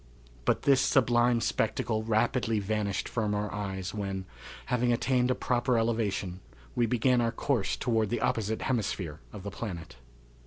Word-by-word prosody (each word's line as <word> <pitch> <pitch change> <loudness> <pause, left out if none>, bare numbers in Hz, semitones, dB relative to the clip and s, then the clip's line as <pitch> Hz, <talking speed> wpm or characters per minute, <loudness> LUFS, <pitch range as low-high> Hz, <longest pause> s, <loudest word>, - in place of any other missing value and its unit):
But - - +2
this 135 -2 +5
sublime 120 -3 +3
spectacle 110 -1 0
rapidly 115 +1 +1
vanished 105 -1 -1
from 105 -3 -1
our 105 0 -2
eyes 95 -2 -4
when, 95 -2 -3 0.4
having 125 0 +1
attained 125 +1 +2
a 130 - +2
proper 125 0 +1
elevation, 105 -5 0 0.3
we 120 - +2
began 125 +2 +3
our 115 -1 +1
course 115 -4 0
toward 110 -3 +1
the 120 - -1
opposite 110 -4 0
hemisphere 95 - -2
of 100 -3 -9
the 100 - -5
planet. 90 - -6
115 Hz, 150 wpm, -29 LUFS, 100-120 Hz, 0.4 s, this